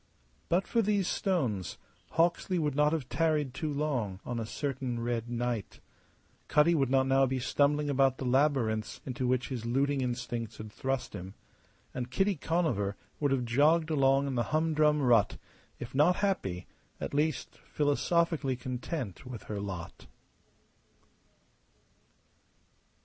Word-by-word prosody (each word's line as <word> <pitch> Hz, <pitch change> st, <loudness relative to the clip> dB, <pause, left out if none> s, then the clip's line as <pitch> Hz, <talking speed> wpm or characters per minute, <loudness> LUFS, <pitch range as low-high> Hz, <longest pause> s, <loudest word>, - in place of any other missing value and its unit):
But 180 Hz, +3 st, +2 dB
for 230 Hz, -, +2 dB
these 205 Hz, -3 st, +1 dB
stones 130 Hz, -, -1 dB, 0.4 s
Hawksley 170 Hz, +2 st, +2 dB
would 150 Hz, -4 st, 0 dB
not 150 Hz, +1 st, +3 dB
have 155 Hz, -6 st, -2 dB
tarried 150 Hz, +1 st, +1 dB
too 150 Hz, +2 st, -3 dB
long 130 Hz, -10 st, -1 dB
on 120 Hz, -1 st, -3 dB
a 110 Hz, -, -4 dB
certain 130 Hz, -3 st, -3 dB
red 120 Hz, 0 st, -2 dB
night; 120 Hz, -3 st, -3 dB, 0.7 s
Cutty 150 Hz, +3 st, +4 dB
would 135 Hz, -6 st, +2 dB
not 130 Hz, 0 st, +3 dB
now 135 Hz, 0 st, +4 dB
be 130 Hz, +1 st, -1 dB
stumbling 145 Hz, +3 st, +1 dB
about 135 Hz, -2 st, +3 dB
the 135 Hz, -, -4 dB
labyrinths 125 Hz, -5 st, +1 dB
into 130 Hz, -1 st, -2 dB
which 125 Hz, 0 st, 0 dB
his 125 Hz, -4 st, -4 dB
looting 135 Hz, +4 st, +1 dB
instincts 120 Hz, -2 st, -3 dB
had 110 Hz, 0 st, -8 dB
thrust 130 Hz, +2 st, -3 dB
him; 95 Hz, 0 st, -7 dB, 0.6 s
and 125 Hz, -1 st, -4 dB
Kitty 195 Hz, +9 st, +1 dB
Conover 140 Hz, -, 0 dB, 0.2 s
would 145 Hz, -, +2 dB
have 135 Hz, -2 st, +1 dB
jogged 155 Hz, +7 st, +3 dB
along 135 Hz, -1 st, +3 dB
in 140 Hz, -, -2 dB
the 120 Hz, -2 st, 0 dB
humdrum 155 Hz, -1 st, +2 dB
rut, 120 Hz, -5 st, +4 dB, 0.4 s
if 120 Hz, -, -8 dB
not 150 Hz, +7 st, +4 dB
happy 100 Hz, -, -1 dB, 0.3 s
at -, -, -4 dB
least 150 Hz, 0 st, -1 dB
philosophically 150 Hz, -1 st, +1 dB
content 125 Hz, -, -5 dB
with 125 Hz, -4 st, -7 dB
her 105 Hz, -1 st, -5 dB
lot. 95 Hz, -4 st, -7 dB
135 Hz, 140 wpm, -30 LUFS, 120-150 Hz, 0.7 s, Cutty